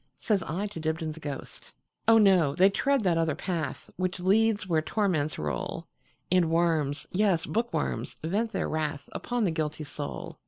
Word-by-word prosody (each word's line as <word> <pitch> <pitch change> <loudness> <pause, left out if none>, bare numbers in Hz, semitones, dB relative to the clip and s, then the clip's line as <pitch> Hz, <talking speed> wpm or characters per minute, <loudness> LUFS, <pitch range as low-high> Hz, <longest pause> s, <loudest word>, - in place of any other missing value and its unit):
Says 205 -4 +1
I 170 +5 -3
to 205 -4 -6
Dibdin's 160 0 -2
ghost."Oh, 150 +9 -2
no! 185 -9 +5
they 190 +3 +5
tread 275 +3 +1
that 170 -3 +2
other 160 -3 +1
path, 165 -4 -3
Which 185 +1 -1
leads 205 +2 +2
where 160 -3 +2
torments 155 -6 0
roll, 75 -1 -3 0.5
And 180 -3 +4
worms, 160 -4 +1
yes, 185 -4 +2
bookworms, 235 +2 -2
vent 210 +8 0
their - - -1
wrathUpon 155 - -2
the 180 - +1
guilty 155 -1 -2
soul. 145 0 -6
170 Hz, 150 wpm, -28 LUFS, 155-200 Hz, 0.5 s, no